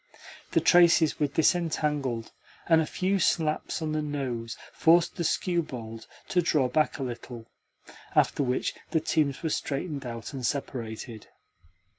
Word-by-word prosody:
The - - +4
traces 170 -3 +5
were 150 - +2
disentangled, 150 -6 0 0.4
and 165 -1 +5
a 155 - -2
few 190 +1 0
slaps 160 -1 0
on 155 - -2
the 155 0 0
nose 130 -6 -4 0.2
forced 170 +1 +4
the 170 - -2
skewbald 125 -11 -2 0.2
to 180 - +3
draw 150 -5 +2
back 155 +4 +1
a 135 - -4
little; 120 -2 -7 0.6
after - - +3
which 125 -2 0 0.2
the 160 - +2
teams 150 -3 0
were 160 - 0
straightened 145 0 -3
out 115 0 -6
and 135 -2 -6
separated. 115 -4 -4
145 Hz, 140 wpm, -27 LUFS, 125-160 Hz, 0.6 s, traces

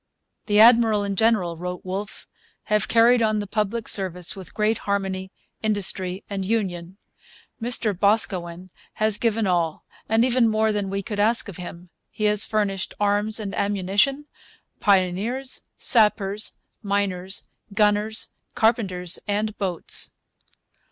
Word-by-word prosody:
'The 205 -1 +3
Admiral 225 -2 +6
and 200 -1 -2
General,' 200 -5 +2
wrote 180 +1 -6
Wolfe, 195 +3 -5 0.4
'have 210 0 0
carried 235 +1 +4
on 215 -1 +2
the 205 - -2
public 215 +2 -2
service 180 -3 0
with 190 -3 -10
great 215 +1 +1
harmony, 190 -1 -2 0.3
industry, 195 -3 -1
and 200 -1 -4
union. 185 -4 -2 0.6
Mr 225 -2 +2
Boscawen 185 -3 0 0.2
has 215 -1 +1
given 225 -2 +1
all, 170 -4 -1 0.2
and 225 +2 +3
even 245 -2 +3
more 220 0 +1
than 205 -2 -2
we 195 +1 -3
could 205 +1 -5
ask 225 +3 +2
of 200 - -8
him. 175 0 -9 0.2
He 215 - -6
has 210 -1 +5
furnished 205 -3 -2
arms 205 +2 +1
and 205 -2 -5
ammunition, 200 +8 +1 0.6
pioneers, 205 +7 0
sappers, 210 -2 +2 0.2
miners, 195 -2 -2 0.2
gunners, 210 +1 +1 0.3
carpenters, 190 -6 0
and 210 +1 -1
boats.' 185 -4 0
205 Hz, 130 wpm, -23 LUFS, 190-220 Hz, 0.6 s, Admiral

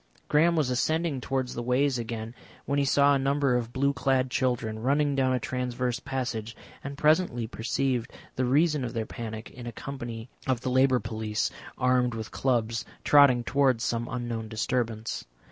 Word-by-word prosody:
Graham 165 +3 +4
was 150 -6 +1
ascending 155 +3 0
towards 130 -1 -2
the 120 - -4
ways 125 +2 +1
again 115 0 -5 0.3
when 140 +1 0
he 140 - +2
saw 140 +1 +4
a 140 - +2
number 140 -1 +2
of 120 -1 -1
blue 140 +2 +1
clad 130 -1 +1
children 120 -4 0
running 140 +4 +2
down 135 -1 +2
a 130 - +1
transverse 125 -1 -2
passage, 120 -5 -4 0.3
and 140 +1 -6
presently 150 -6 +2
perceived 120 +1 -1 0.2
the 130 - 0
reason 150 +2 +3
of 120 - -4
their 110 -1 -1
panic 110 -1 -7
in 120 -1 -9
a - - -4
company 120 -2 -6 0.2
of 130 -2 +1
the 130 - -2
Labour 130 0 +4
Police 110 -1 -2 0.3
armed 125 -2 +2
with 110 -1 -6
clubs, 115 -3 0 0.2
trotting 140 -4 +6
towards 130 -2 +2
some 120 0 -1
unknown 120 -3 -3
disturbance. 115 0 -2
125 Hz, 170 wpm, -28 LUFS, 115-135 Hz, 0.3 s, trotting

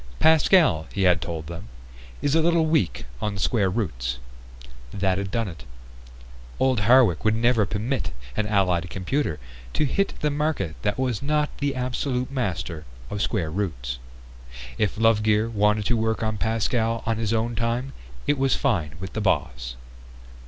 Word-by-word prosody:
"Pascal," 160 - +4
he 100 - -1
had 90 -2 +4
told 80 -2 -4
them, 85 +2 -8 0.6
"is 145 - +2
a 165 - +4
little 165 0 +3
weak 145 - +1 0.2
on 105 -1 -2
square 100 0 +2
roots." 65 - -2 0.7
That 95 -1 0
had 100 -1 -3
done 115 +2 -1
it! 85 -3 -9 1.0
Old 130 -3 +3
Hardwick 110 -5 +5
would 110 0 +3
never 115 -2 +3
permit 105 -2 -2 0.2
an 105 - 0
Allied 90 -4 +1
computer 95 - -1 0.3
to 150 - +1
hit 195 +8 0
the 150 - +1
market 145 - -1
that 105 +1 0
was 130 -4 -1
not 150 +1 0
the 140 -1 0
absolute 125 0 -2
master 95 - -3 0.3
of 105 - -2
square 90 -10 -1
roots. 75 -11 -3 0.8
If 105 -1 +1
Lovegear 110 0 +3
wanted 105 0 +2
to 120 - +2
work 110 0 0
on 110 -1 -1
Pascal 115 +1 0
on 115 -1 0
his 110 -1 -1
own 115 +1 0
time 120 +4 -1 0.3
it 145 -2 +1
was 135 0 +3
fine 90 - 0
with 95 0 -7
the 110 - -2
boss. 60 -11 -1
110 Hz, 160 wpm, -25 LUFS, 95-130 Hz, 1.0 s, Hardwick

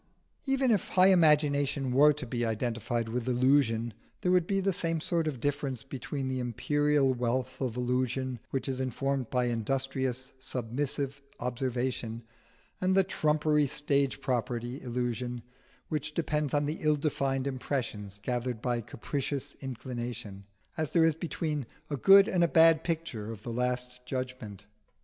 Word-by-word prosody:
Even 270 -2 +2
if 210 - +1
high 185 +1 +6
imagination 145 -6 +3
were 145 +4 +6
to 145 -2 -5
be 120 0 -2
identified 115 0 -1
with 120 +2 -3
illusion, 125 -3 +2 0.3
there 180 - +2
would 180 -2 +3
be 195 -1 +1
the 195 0 +1
same 165 -3 0
sort 165 0 0
of 140 -5 -3
difference 140 -1 -2
between 135 0 -4
the 130 0 -2
imperial 145 +3 +2
wealth 125 +2 -2
of 125 -3 -2
illusion 125 0 -1
which 135 0 -2
is 130 -1 -1
informed 130 0 -1
by 125 -1 +1
industrious 130 +2 -2
submissive 135 +3 -3 0.2
observation 125 -2 -2 0.6
and 185 +1 +2
the 195 - +6
trumpery 150 -4 +2
stage 140 0 +1
property 120 0 -2
illusion 120 -1 -3 0.4
which 150 0 -3
depends 150 -3 0
on 145 0 +2
the 150 +2 -3
ill 155 -1 +3
defined 135 -2 -1
impressions 120 -7 -3
gathered 125 -1 -2
by 120 0 -1
capricious 140 +4 -4
inclination, 120 -5 -6 0.3
as 155 -3 0
there 165 -2 +4
is 165 - +4
between 155 -4 -3 0.2
a - - +1
good 195 - +7
and 180 -6 +2
a - - +5
bad 165 -1 +6
picture 160 -11 -3
of 105 -2 -9
the 120 - -4
Last 125 +1 -2
Judgment. 130 -6 -5
130 Hz, 150 wpm, -30 LUFS, 120-150 Hz, 0.6 s, good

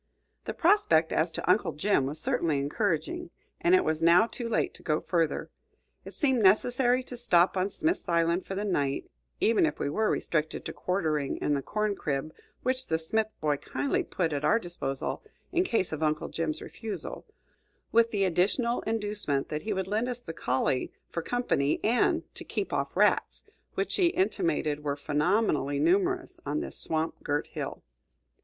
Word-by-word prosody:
The - - -4
prospect 320 - +3
as 165 +2 +2
to - - -5
Uncle 180 -3 +3
Jim 150 -2 +1
was 150 +3 -4
certainly 160 -1 0
encouraging, 200 - -1 0.3
and 345 +2 +4
it 370 - +4
was 160 0 0
now 170 +5 +6
too 235 0 -5
late 230 - 0
to - - -9
go 155 -2 0
further. 165 -4 -1 0.5
It - - -10
seemed 265 -5 +2
necessary 245 +5 +4
to 250 - -8
stop 185 -8 +3
on 185 +1 +1
Smith's 320 - -1
Island 170 +1 +1
for 195 - -4
the 205 +2 -2
night, 140 -8 -1 0.3
even 225 0 +3
if 150 -2 +1
we 140 - -2
were 215 +6 +1
restricted 155 -1 -1
to - - -4
quartering 155 -7 -1
in 150 - 0
the 140 - 0
corn 210 +6 -1
crib 150 -2 -3 0.3
which 255 +1 0
the 160 - +1
Smith 215 +7 0
boy 150 -2 +1
kindly 285 - -1
put 170 - -1
at 145 0 -2
our 210 +9 +4
disposal 170 - -4 0.3
in 360 0 +2
case 230 - 0
of 155 0 -4
Uncle 155 -1 0
Jim's 155 -2 -2
refusal, 225 -2 -6 0.6
with 230 0 +4
the 205 -3 0
additional 200 +7 +1
inducement 210 -10 -1
that 150 0 -3
he 215 - -4
would 190 -2 -1
lend 220 +5 0
us 245 -1 -4
the 165 - -7
collie 130 -3 0 0.2
for 170 - -2
company 160 - 0
and 235 +3 +2
to - - -5
"keep - - -3
off - - -2
rats," - - +2 0.3
which - - 0
he 370 -3 +4
intimated 340 - 0
were 145 -1 -1
phenomenally 150 0 +1
numerous 365 - +1
on 310 - -1
this 340 - -5
swamp 160 0 +1
girt 145 0 0
hill. - - -6
185 Hz, 175 wpm, -28 LUFS, 155-235 Hz, 0.6 s, now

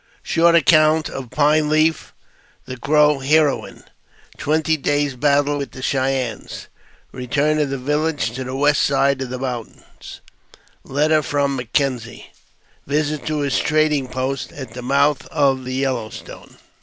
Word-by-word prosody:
Short 170 +1 +3
Account 155 -1 +4
of 130 -3 -7
Pine 150 +2 +2
Leaf, 155 +1 +1 0.5
the 130 - -7
Crow 150 +2 +3
Heroine 150 +2 +1 0.3
— - - -28
Twenty 160 +1 +1
Days' 145 -1 -1
Battle 145 +2 +1
wil 140 - -3
the 130 - -10
Cheyennes 130 -5 -2 0.2
— - - -24
Keturn 145 +5 0
of 145 -2 0
the 135 - -3
Village 150 0 -1
to 130 +2 -5
the 130 +1 -6
west 145 +1 +2
Side 140 -1 +1
of 130 - -4
the 130 - -4
Moun 125 -3 -6 0.2
tains— - - -11 0.6
Letter 155 +3 +1
from 140 0 -1
M'Kenzie 125 -1 -2 0.3
— - - -37
Visit 150 +1 -1
to 155 -1 -1
his 140 -1 0
Trading 155 -3 +1
post 130 +1 -4
at 130 -5 -9
the 125 - -7
Moui 140 +3 +2
of 135 -3 +1
the 130 0 -4
Yellow 130 -5 -1
Stone. - - -12
140 Hz, 155 wpm, -20 LUFS, 130-150 Hz, 0.6 s, Account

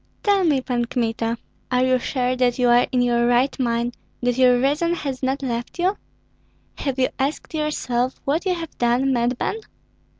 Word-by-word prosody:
"Tell 400 -2 +3
me, 295 -6 +2
Pan 245 -2 -1
Kmita, 230 -1 -1 0.3
are 250 0 +2
you 255 0 +3
sure 250 +1 -1
that 250 -1 +1
you 250 -1 +3
are 240 +1 +5
in 250 -1 +2
your 240 -1 +2
right 245 +3 +2
mind, 235 -1 0 0.3
that 245 -1 +2
your 250 -1 +5
reason 300 +6 +1
has 275 -5 -4
not 270 +1 -1
left 240 +1 -3
you? 370 +3 +1 0.8
Have 275 -2 -2
you 260 -1 +2
asked 280 +5 -2
yourself 260 -5 -1
what 300 +5 0
you 365 - +2
have 330 -2 -7
done, 245 +3 +2
madman? 245 - 0
255 Hz, 175 wpm, -22 LUFS, 240-280 Hz, 0.8 s, are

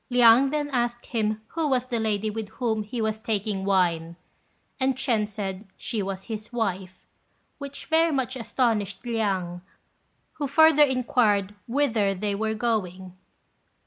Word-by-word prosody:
Liang 245 +2 +6
then 295 0 -1
asked 240 -2 -1
him 215 -2 -1
who 325 -2 -1
was 255 -3 +1
the 245 -2 -2
lady 215 -1 0
with 220 -1 -5
whom 225 -4 0
he 215 +3 -5
was 220 -1 -1
taking 210 -3 -2
wine, 170 -4 +1 0.6
and 260 0 +2
Ch'ên 230 -5 0
said 200 -1 -5
she 220 - -3
was 190 -1 -4
his 215 0 -7
wife, 190 -6 -3 0.5
which 280 -1 -7
very 325 +1 +3
much 265 -2 -1
astonished 225 -5 -1
Liang, 195 -7 -1 0.8
who 285 - +1
further 315 +1 +6
inquired 245 -7 +2
whither 230 -7 +1
they 205 +2 -2
were 220 +2 -1
going. 190 -6 -2
220 Hz, 145 wpm, -26 LUFS, 200-250 Hz, 0.8 s, Liang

